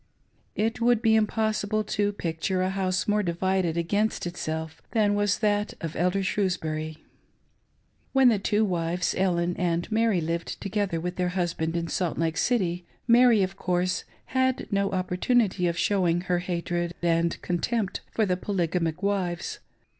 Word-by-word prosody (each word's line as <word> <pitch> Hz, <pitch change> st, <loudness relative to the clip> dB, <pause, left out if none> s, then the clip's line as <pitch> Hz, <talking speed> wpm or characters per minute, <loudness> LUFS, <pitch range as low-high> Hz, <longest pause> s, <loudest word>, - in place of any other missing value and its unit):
It 225 Hz, +2 st, -1 dB
would 235 Hz, -1 st, +3 dB
be 225 Hz, -, +4 dB
impossible 215 Hz, -1 st, +1 dB
to 205 Hz, -1 st, 0 dB
picture 185 Hz, 0 st, -2 dB
a 185 Hz, -, 0 dB
house 185 Hz, -1 st, -1 dB
more 210 Hz, 0 st, +2 dB
divided 180 Hz, -1 st, 0 dB
against 205 Hz, +6 st, 0 dB
itself 160 Hz, -2 st, -4 dB
than 210 Hz, -3 st, +3 dB
was 205 Hz, 0 st, +2 dB
that 210 Hz, -1 st, 0 dB
of 165 Hz, -4 st, -5 dB
Elder 180 Hz, +3 st, +1 dB
Shrewsbury. 160 Hz, -5 st, -1 dB, 1.1 s
When 265 Hz, -2 st, +6 dB
the 220 Hz, -4 st, +2 dB
two 210 Hz, +2 st, +2 dB
wives, 175 Hz, -1 st, -1 dB
Ellen 175 Hz, -2 st, +1 dB
and 175 Hz, +2 st, -1 dB
Mary, 220 Hz, -3 st, +2 dB
lived 165 Hz, +1 st, -3 dB
together 200 Hz, -4 st, -1 dB
with 180 Hz, +2 st, -4 dB
their 180 Hz, -1 st, +1 dB
husband 170 Hz, -2 st, -1 dB
in 170 Hz, 0 st, -2 dB
Salt 175 Hz, 0 st, -1 dB
Lake 165 Hz, 0 st, 0 dB
City, 180 Hz, -8 st, +1 dB, 0.2 s
Mary, 235 Hz, -3 st, +6 dB
of 190 Hz, +1 st, -3 dB
course, 180 Hz, -1 st, 0 dB, 0.3 s
had 260 Hz, -1 st, +1 dB
no 200 Hz, 0 st, +1 dB
op 185 Hz, -1 st, -2 dB
portunity 185 Hz, -2 st, +2 dB
of 170 Hz, -, -3 dB
showing 175 Hz, -3 st, +2 dB
her 180 Hz, -1 st, 0 dB
hatred 175 Hz, -1 st, -2 dB
and 170 Hz, 0 st, +1 dB
contempt 195 Hz, +4 st, -1 dB
for 220 Hz, -, +1 dB
the 180 Hz, -2 st, 0 dB
Poly 185 Hz, -3 st, -1 dB
gamic 165 Hz, +1 st, -1 dB
wives. 190 Hz, -4 st, -1 dB
185 Hz, 155 wpm, -26 LUFS, 170-210 Hz, 1.1 s, When